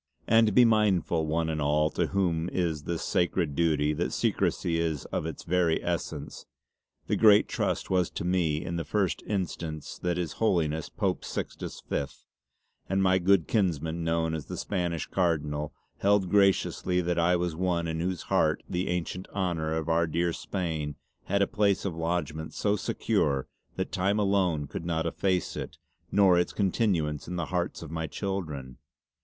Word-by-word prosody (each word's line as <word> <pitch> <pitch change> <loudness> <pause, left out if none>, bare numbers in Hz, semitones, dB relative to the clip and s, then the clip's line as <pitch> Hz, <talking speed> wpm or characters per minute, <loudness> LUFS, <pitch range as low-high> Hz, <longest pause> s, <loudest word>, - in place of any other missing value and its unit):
And 110 -2 +4
be 125 - +8
mindful 95 -7 +2
one 80 +1 0
and 80 -1 -2
all 75 +1 +2
to - - 0
whom 90 -3 0
is 80 -5 -1
this 85 -1 -2
sacred 85 -4 0
duty 75 -2 +2
that - - -1
secrecy 85 -1 0
is 80 -4 -1
of 80 - -1
its 80 - -6
very 85 -2 +2
essence. - - -4 0.6
The - - 0
great 105 -2 +6
Trust - - -2
was 90 -2 +2
to - - -5
me 85 -4 +1
in 85 - -3
the 85 - -2
first 95 +5 0
instance 85 -6 -3
in - - -3
that 85 -1 +1
His 85 -4 -2
Holiness 80 -7 +1
Pope - - -1
Sixtus - - -5
Fifth 70 - -4 0.6
and 95 +1 +2
my 95 0 +4
good 95 -2 +3
kinsman 85 -5 0
known 80 0 0
as 80 -3 -4
the - - -5
Spanish 85 -4 -2
Cardinal 75 -4 -1 0.3
held 100 -2 +2
graciouslly 95 -2 +2
that 85 0 +1
I 85 +2 +4
was 85 -2 -1
one 85 -1 0
in 80 0 -2
whose 90 0 -2
heart - - +1
the 90 +1 -2
ancient 90 +1 -3
honour 85 -5 -1
of 80 -1 -2
our 85 0 +2
dear 85 +2 0
Spain 80 -7 -3 0.3
had 100 +1 +2
a - - +4
place 100 -2 +1
of 90 -4 -2
lodgement 80 -2 -2
so 105 0 +1
secure 70 -8 0 0.3
that - - -3
time 100 +3 +1
alone 95 -7 +2
could 75 - -6
not 80 -1 -1
efface 90 +2 0
it - - -6 0.3
nor 95 -3 +5
its 90 - 0
continuance 90 -7 0
in 90 - -4
the 85 -2 -1
hearts 85 -1 -1
of 80 - -9
my 80 -1 -2
children. 75 -12 -4
85 Hz, 170 wpm, -28 LUFS, 80-95 Hz, 0.6 s, be